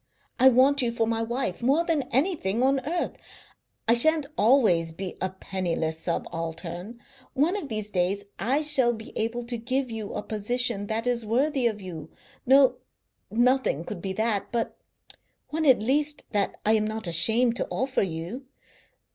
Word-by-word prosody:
I 265 - +8
want 265 +3 +4
you 240 -2 0
for 230 -1 0
my 225 0 -1
wife 230 -4 -2
more 280 +8 +2
than 300 -6 -1
anything 255 - 0
on 270 +1 +3
earth. 345 +1 -2 0.7
I 230 - +6
shan't 310 +5 +5
always 210 -9 +3
be 185 +2 -6
a 185 - 0
penniless 175 -4 -3
subaltern. 170 +5 -4 0.4
One 310 +8 +2
of 335 -9 -4
these 215 -2 -3
days 190 +2 0 0.2
I 265 +8 +1
shall 265 -5 +4
be 220 -1 -10
able 230 +2 -2
to 240 0 -4
give 255 +2 -2
you 220 -2 -5
a - - -3
position 215 0 -1
that 225 +2 -2
is 245 -2 0
worthy 260 +4 +1
of 210 -3 -4
you; 165 -4 -8 0.4
no, 270 0 +5 0.5
nothing 240 - +1
could 170 - -7
be 190 0 -3
that, 215 0 -1
but 235 -2 -2 0.7
one 315 0 -1
at 250 -6 +5
least 290 +4 0
that 205 -2 0
I 215 - +4
am 215 -1 +2
not 220 0 -4
ashamed 225 +8 +3
to - - -1
offer 260 0 -1
to 195 - +1
you. 180 +11 -6
230 Hz, 170 wpm, -26 LUFS, 195-265 Hz, 0.7 s, I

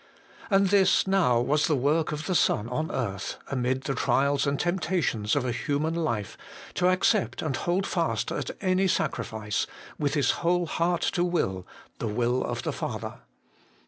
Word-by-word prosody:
And 195 -2 +4
this 195 -1 +4
now 190 -11 +3
was 150 +5 +2
the 155 - +2
work 150 +4 +1
of 150 +1 -4
the 185 - -1
Son 115 -9 +2
on 155 +6 -2
earth, 100 -6 -3
amid 130 0 0
the 135 - -2
trials 140 +1 +1
and 140 0 0
temptations 170 - 0
of 140 -3 0
a 125 - 0
human 145 +6 -1
life, 120 - -2 0.3
to 180 - +2
accept 185 +3 +1
and 150 -4 -1
hold 180 +3 0
fast - - -1
at - - -3
any 185 0 +2
sacrifice, 110 - -1 0.3
with 145 0 0
His 140 -3 +3
whole 175 +1 +2
heart 170 +2 0
to 175 - +1
will, 95 - -1 0.3
the - - -2
will 120 +4 0
of - - -3
the - - -2
Father. - - -5
150 Hz, 170 wpm, -27 LUFS, 125-175 Hz, 0.3 s, And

